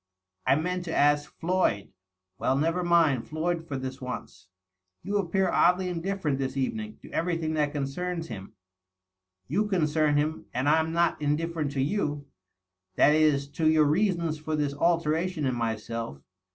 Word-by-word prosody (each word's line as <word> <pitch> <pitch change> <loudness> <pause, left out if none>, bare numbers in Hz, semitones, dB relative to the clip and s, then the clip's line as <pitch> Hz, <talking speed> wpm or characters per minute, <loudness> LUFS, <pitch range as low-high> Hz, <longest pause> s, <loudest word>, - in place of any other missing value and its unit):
I - - +5
meant 180 +4 -1
to 165 - -3
ask 145 0 +3
Floyd 180 -4 +1
^" - - -24 0.3
" 95 0 -56
Well, 130 - +1
never 165 +5 +1
mind 165 -8 +3
Floyd, 165 +1 -2
for 135 - -3
this 130 +1 -6
once." 125 -6 -7 0.6
"You 200 +3 0
appear 190 0 +1
oddly 180 +1 +3
indifierent, 165 -5 -2
this 135 0 -2
evening, 215 +11 -3
to - - -12
everything 165 -2 -1
that 150 -2 +1
concerns 165 +5 -3
him." 100 -5 -8 0.5
" 95 0 -55
You 205 +9 +1
concern 155 -5 +2
him, 155 +2 -1
and 130 +3 0
I'm 160 +2 +3
not 170 +1 +1
indifierent 150 0 -1
to 135 - 0
you. 150 -3 -1 0.7
That 150 - +5
is, 150 -3 +3
to 155 +2 +1
your 155 -1 +5
reasons 170 -1 +1
for 155 0 -2
this 145 -2 0
alteration 165 +1 +1
in 130 - +1
myself. 115 - -3
155 Hz, 165 wpm, -27 LUFS, 140-170 Hz, 0.7 s, I